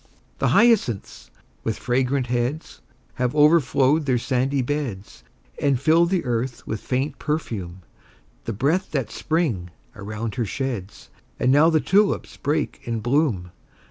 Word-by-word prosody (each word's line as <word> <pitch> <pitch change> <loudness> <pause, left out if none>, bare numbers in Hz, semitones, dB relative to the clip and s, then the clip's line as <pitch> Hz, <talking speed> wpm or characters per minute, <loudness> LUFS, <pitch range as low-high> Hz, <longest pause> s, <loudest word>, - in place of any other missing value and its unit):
The - - +2
hyacinths, 160 - +2 0.3
with 110 - -2
fragrant 130 +1 0
heads, 120 - -3 0.4
Have 125 +2 0
overflowed 150 -1 +4
their 125 -2 +3
sandy 130 +2 0
beds, 125 -8 -4 0.4
And 140 -3 +2
fill 160 +5 +4
the 180 -3 0
earth 120 0 -2
with 110 - -3
faint 135 +4 -2
perfume, 100 - -4 0.6
The 115 - -3
breath 155 - 0
that 135 -7 -1
Spring 145 - -1 0.3
around 105 +1 -5
her - - +1
sheds. 115 -4 -5 0.3
And 125 - +3
now 150 +4 +6
the 160 -1 +3
tulips 200 +5 +1
break 150 +2 -2
in 115 -2 -2
bloom! 120 - 0
130 Hz, 135 wpm, -23 LUFS, 115-150 Hz, 0.6 s, now